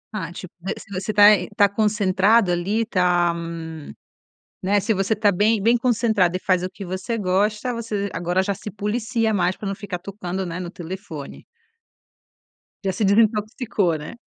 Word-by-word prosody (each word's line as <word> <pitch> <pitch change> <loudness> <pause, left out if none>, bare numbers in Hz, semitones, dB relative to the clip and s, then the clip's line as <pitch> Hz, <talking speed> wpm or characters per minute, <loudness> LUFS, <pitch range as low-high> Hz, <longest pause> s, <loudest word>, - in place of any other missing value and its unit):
Ah 180 -6 -4
tipo 180 0 -9
você 190 - -3 0.2
você 190 +3 -2
tá 205 0 +6 0.3
tá 205 - +6
concentrado 205 0 +2
ali, 200 +6 0
tá 180 -4 +2 1.3
né, 200 +2 +3
se 215 +3 0
você 195 +2 +1
tá 210 -1 +2
bem 210 +3 +2
bem 230 +4 +4
concentrado 220 -7 +2
e - - -10
faz 185 -1 +1
o 185 - -2
que 195 +1 -9
você 185 +6 -3
gosta, 210 +5 0
você 215 -4 -3
agora 175 +2 0
já 200 +1 -1
se 205 +2 -8
policia 220 +2 -1
mais 180 -2 +1
para 205 - -6
não 195 - -2
ficar 195 -3 -6
tocando, 190 0 -5
né, 170 -1 -5
no 175 - -5
telefone. 175 -5 -8 1.4
Já 190 - +2
se 185 - -2
desintoxicou, 215 -2 +2
né. 150 +8 -8
200 Hz, 165 wpm, -22 LUFS, 185-215 Hz, 1.4 s, tá